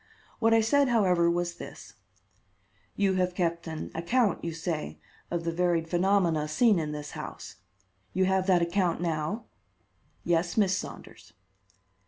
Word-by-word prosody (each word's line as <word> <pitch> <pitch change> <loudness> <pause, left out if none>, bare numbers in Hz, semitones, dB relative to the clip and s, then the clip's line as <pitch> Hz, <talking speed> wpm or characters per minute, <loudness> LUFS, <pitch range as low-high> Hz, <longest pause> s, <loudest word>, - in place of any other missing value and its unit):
What 225 -1 +3
I 225 0 +5
said, 275 +5 +3
however, 180 -7 +3
was 175 0 -1
this: - - -10 1.0
"You 200 -1 +2
have 180 -1 0
kept 170 -2 -1
an 160 -1 -5
account, 200 +5 +1
you 170 - -2
say, 165 -1 -4 0.3
of 170 -1 -2
the 170 - -1
varied 170 -1 +1
phenomena 175 -3 +2
seen 210 +5 +3
in 155 -2 -3
this 150 -1 -6
house? - - -8 0.5
You 185 +1 +1
have 190 0 +1
that 180 -3 +4
account 175 0 0
now?" 170 +6 -2 0.8
"Yes, 175 +2 0
Miss 195 -3 +3
Saunders." - - -8
175 Hz, 145 wpm, -28 LUFS, 165-195 Hz, 1.0 s, I